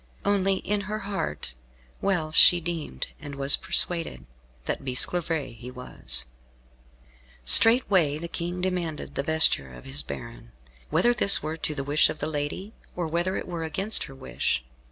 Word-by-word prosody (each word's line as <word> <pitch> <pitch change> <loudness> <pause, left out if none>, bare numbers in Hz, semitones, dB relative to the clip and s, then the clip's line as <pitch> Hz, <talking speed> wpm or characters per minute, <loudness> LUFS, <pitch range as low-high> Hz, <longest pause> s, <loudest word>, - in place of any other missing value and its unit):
Only, 195 -1 +1
in 205 +2 -3
her 215 - -3
heart, 195 - -5 0.5
well 175 -6 -1
she 175 +2 +6
deemed 165 - -5
and 145 -1 -9
was 140 0 +6
persuaded, 165 - +2 0.4
that - - -4
Bisclavaret 135 -1 -3
was 65 - -3
he. 60 0 -32 0.4
Straightway 190 - +5
the 170 +2 -6
King 175 +1 -5
demanded 180 -4 -4
the - - -2
vesture 155 - +2
of 60 -1 -13
his 70 +2 -3
baron, - - -10 0.4
whether 240 0 +2
this 200 -8 +5
were 155 +1 -4
to 155 -1 -3
the 140 - -4
wish 145 +2 +2
of - - -5
the 150 - -3
lady, 155 +7 -5 0.2
or 175 - -3
whether 170 +4 -2
it - - -6
were 170 -2 -5
against 190 +7 0
her 135 - -12
wish. 130 - -3
155 Hz, 155 wpm, -25 LUFS, -, 0.5 s, she